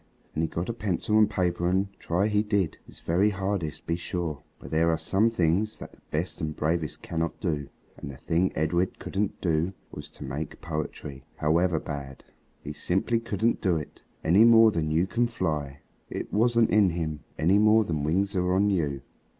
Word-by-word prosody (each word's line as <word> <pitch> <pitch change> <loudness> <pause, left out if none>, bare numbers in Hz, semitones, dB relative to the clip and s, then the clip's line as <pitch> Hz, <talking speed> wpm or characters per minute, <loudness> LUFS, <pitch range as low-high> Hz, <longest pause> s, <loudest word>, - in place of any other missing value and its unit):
And 80 - -1
he 80 - +1
got 85 +3 -4
a 115 - -2
pencil 105 0 0
and 105 -1 +5
paper 90 -4 0
and 95 +2 +1
try 90 +4 0
he 105 -1 +2
did, 100 -6 0
his - - -12
very 95 +5 +2
hardest, 95 -6 -3
be 85 - 0
sure. 85 -4 -3 0.2
But - - -11
there 80 +1 +3
are 80 - +2
some 100 +7 +2
things 100 +1 +1
that - - -9
the - - -22
best 85 +4 -3
and 75 -1 -3
bravest 80 0 -2
cannot 85 -1 -3
do. 75 -5 -2 0.3
And - - -7
the 65 - -8
thing 90 +3 +1
Edred 85 +4 0
couldn't 100 0 -3
do 85 +1 +1 0.2
was 75 0 -8
to 75 - -11
make 70 +3 -5
poetry, 75 -4 -5
however 80 +2 +2
bad. 70 -3 -7 0.4
He 75 - -5
simply 95 +9 0
couldn't 115 0 0
do 90 -4 +2
it, 75 - -8 0.2
any 95 +7 +5
more 115 -1 +7
than 80 -5 -1
you 80 +3 +2
can 120 +5 +1
fly. 75 -10 -3 0.3
It - - -5
wasn't 115 +1 +3
in 105 -2 +5
him, 80 -3 -3 0.2
any 95 +6 +4
more 110 +1 +5
than 80 -5 -2
wings 95 +7 0
are 90 0 +1
on 100 +2 +3
you. 75 -7 -1
85 Hz, 190 wpm, -27 LUFS, 80-100 Hz, 0.4 s, more